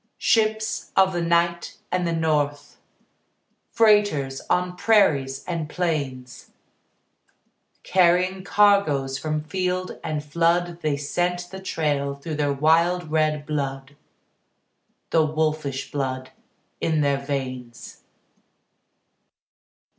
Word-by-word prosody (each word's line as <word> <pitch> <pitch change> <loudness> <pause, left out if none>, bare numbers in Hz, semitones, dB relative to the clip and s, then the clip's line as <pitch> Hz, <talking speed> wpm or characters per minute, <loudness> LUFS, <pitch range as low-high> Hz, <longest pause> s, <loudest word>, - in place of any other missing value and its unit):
Ships 220 0 +1
of 190 -1 +4
the 175 - -1
night 170 0 0
and 180 -1 0
the - - 0
north, 150 -3 -1 0.9
Freighters 205 -12 +3
on 180 0 0
prairies 140 -11 +2
and 165 -3 -3
plains, 140 -8 -3 1.3
Carrying 185 +1 +2
cargoes 185 -11 +2
from 155 -1 -2
field 185 +2 -3
and 150 -1 -3
flood 170 +3 0
They 150 -3 0
scent 175 +4 -2
the 190 - -7
trail 145 -6 -1
through 150 +2 -6
their 145 -1 +1
wild 160 +3 +2
red 155 -2 +1
blood, 140 -2 -4 1.2
The 160 - +4
wolfish 155 -3 -2
blood 130 -2 -3 0.5
in 160 -2 +1
their 140 -1 +1
veins. 130 -4 -6
155 Hz, 100 wpm, -24 LUFS, 140-180 Hz, 1.3 s, of